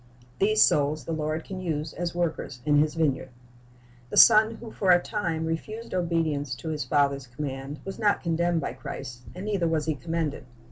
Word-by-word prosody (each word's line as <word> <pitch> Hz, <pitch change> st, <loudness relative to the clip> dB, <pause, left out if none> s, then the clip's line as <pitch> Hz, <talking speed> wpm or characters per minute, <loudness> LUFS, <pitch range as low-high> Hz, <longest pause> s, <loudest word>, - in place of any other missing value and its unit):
"' 125 Hz, 0 st, -28 dB
These 215 Hz, +2 st, +5 dB
souls 145 Hz, -1 st, +2 dB
the -, -, -4 dB
Lord 155 Hz, 0 st, -2 dB
can 190 Hz, -1 st, -7 dB
use 155 Hz, -4 st, -3 dB
as 175 Hz, 0 st, -4 dB
workers 160 Hz, -6 st, -2 dB
in 145 Hz, -1 st, +4 dB
His 150 Hz, +1 st, +1 dB
vineyard. 140 Hz, -5 st, 0 dB, 0.8 s
The -, -, -4 dB
son 220 Hz, 0 st, +7 dB
who 225 Hz, -1 st, -10 dB
for 195 Hz, -, -1 dB
a 175 Hz, -1 st, +7 dB
time 170 Hz, -5 st, -2 dB
refused 215 Hz, +8 st, -4 dB
obedience 160 Hz, -7 st, 0 dB
to 160 Hz, -, -6 dB
his 150 Hz, -2 st, -2 dB
father's 140 Hz, 0 st, +1 dB
command 135 Hz, +2 st, -5 dB
was 195 Hz, -, -6 dB
not 205 Hz, -2 st, +2 dB
condemned 170 Hz, 0 st, +1 dB
by -, -, -3 dB
Christ; 120 Hz, -2 st, -7 dB
and 185 Hz, +2 st, -6 dB
neither 200 Hz, -5 st, 0 dB
was 160 Hz, -2 st, 0 dB
he 160 Hz, -, +1 dB
commended. 160 Hz, -3 st, -3 dB
160 Hz, 190 wpm, -27 LUFS, 145-175 Hz, 0.8 s, son